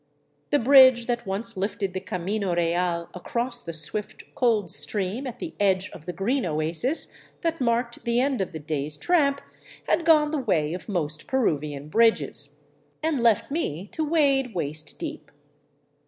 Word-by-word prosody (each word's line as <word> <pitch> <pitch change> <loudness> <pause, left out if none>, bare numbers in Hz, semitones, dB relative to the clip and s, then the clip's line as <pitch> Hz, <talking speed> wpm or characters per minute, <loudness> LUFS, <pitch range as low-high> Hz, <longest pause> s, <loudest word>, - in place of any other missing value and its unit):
The 290 - +3
bridge 260 -2 +6
that 240 -3 -2
once 215 +4 -4
lifted 195 0 -2
the 190 - -2
camino 185 +1 -2
real 170 0 0
across 240 +6 -2
the 170 - -6
swift, 165 +6 -1
cold 220 -8 +1
stream 195 - +1
at 245 -1 -7
the 325 +6 -6
edge 190 -2 +1
of 155 - -13
the - - -2
green 230 - -1
oasis 165 - +1 0.3
that 330 -3 -2
marked 235 0 -1
the 235 0 +1
end 265 -3 +1
of 190 - -3
the - - -6
day's 150 -1 -3
tramp 280 - +2 0.5
had 345 - +2
gone 305 -2 +4
the 310 - -1
way 165 - 0
of 180 +4 -7
most 155 -5 -3
Peruvian 150 - -1
bridges, 150 -7 +2 0.4
and 310 -5 0
left 235 +2 +2
me 195 - -3
to 320 - -2
wade 275 - +1
waist 155 -2 -3
deep. 320 -2 -7
210 Hz, 160 wpm, -25 LUFS, 170-260 Hz, 0.5 s, bridge